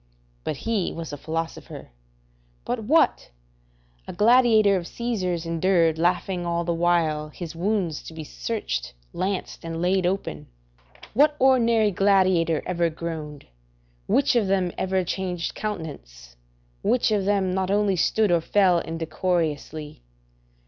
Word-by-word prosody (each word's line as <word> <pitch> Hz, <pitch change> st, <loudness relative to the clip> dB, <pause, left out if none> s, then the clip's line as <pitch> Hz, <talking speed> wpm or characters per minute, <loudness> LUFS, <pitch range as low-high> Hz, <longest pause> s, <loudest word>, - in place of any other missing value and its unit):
But 150 Hz, -, -3 dB
he 220 Hz, -2 st, -1 dB
was 165 Hz, -3 st, -6 dB
a -, -, -2 dB
philosopher. 160 Hz, +3 st, -5 dB, 0.8 s
But 240 Hz, -3 st, -3 dB
what! 315 Hz, +8 st, +2 dB, 0.8 s
a -, -, -6 dB
gladiator 220 Hz, -1 st, +5 dB
of 175 Hz, -2 st, -3 dB
Caesar's 185 Hz, -8 st, -2 dB
endured, 165 Hz, -1 st, +2 dB
laughing 180 Hz, +1 st, 0 dB
all 170 Hz, 0 st, -1 dB
the 170 Hz, 0 st, -1 dB
while, 165 Hz, -3 st, +1 dB
his 165 Hz, +1 st, -8 dB
wounds 180 Hz, -3 st, -1 dB
to -, -, -9 dB
be 160 Hz, -, -6 dB
searched, -, -, -4 dB, 0.2 s
lanced, 190 Hz, -1 st, -3 dB
and 165 Hz, 0 st, -5 dB
laid 180 Hz, +1 st, +2 dB
open: 75 Hz, -, -3 dB, 0.7 s
["What 295 Hz, +5 st, +4 dB
ordinary 235 Hz, -5 st, +4 dB
gladiator 185 Hz, -4 st, +2 dB
ever 170 Hz, -2 st, 0 dB
groaned? 155 Hz, -3 st, -6 dB, 0.6 s
Which 275 Hz, -2 st, +2 dB
of 225 Hz, -5 st, +2 dB
them 190 Hz, -2 st, +1 dB
ever 190 Hz, 0 st, 0 dB
changed 180 Hz, -1 st, -3 dB
countenance? 145 Hz, -, -7 dB, 0.5 s
Which 245 Hz, -2 st, +2 dB
of 205 Hz, -3 st, +1 dB
them 195 Hz, -2 st, +1 dB
not 190 Hz, 0 st, -1 dB
only 200 Hz, -1 st, +2 dB
stood 210 Hz, +3 st, +2 dB
or 170 Hz, -1 st, +3 dB
fell 185 Hz, 0 st, +3 dB
indecorously? 160 Hz, -, -3 dB
180 Hz, 130 wpm, -24 LUFS, 165-200 Hz, 0.8 s, gladiator